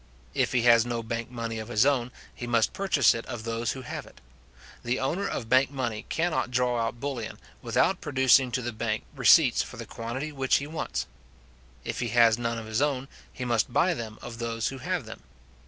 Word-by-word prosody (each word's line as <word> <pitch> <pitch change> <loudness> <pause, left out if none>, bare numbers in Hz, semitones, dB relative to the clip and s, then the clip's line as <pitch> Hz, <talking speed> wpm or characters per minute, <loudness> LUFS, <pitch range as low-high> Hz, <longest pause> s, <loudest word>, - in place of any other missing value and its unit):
If - - +1
he 125 -2 +2
has 115 -2 +6
no 120 -1 -3
bank 115 0 -4
money 115 -2 -4
of 110 - -6
his 120 0 +3
own, 125 -4 +1 0.2
he 120 - -7
must 115 -2 +2
purchase 190 - +3
it 115 - -4
of 120 -3 -6
those 115 0 -2
who 130 - -8
have 125 - -6
it. - - -17 0.6
The 120 +1 -1
owner 175 +9 -1
of 115 - -4
bank 130 +3 +4
money 120 -6 -4
cannot 165 -6 0
draw 125 -1 +1
out 115 +1 -3
bullion, 125 -5 -4 0.2
without - - +1
producing 130 -2 +4
to 125 - -1
the 120 0 -3
bank 110 0 -2
receipts 125 +1 +6
for 125 - -8
the 115 - -6
quantity 120 +8 -5
which 135 -2 +1
he 140 - +1
wants. 155 +2 -3 0.8
If - - -4
he 120 - -1
has 115 0 +4
none 115 -1 -1
of 115 - -6
his 110 +3 -1
own, 135 -2 0 0.2
he 125 - -6
must 120 -2 +1
buy 180 +8 +3
them 110 -6 -6
of 115 -1 -8
those 115 -1 -1
who 135 - -7
have 175 +5 -2
them. - - -10
120 Hz, 210 wpm, -27 LUFS, 115-135 Hz, 0.8 s, has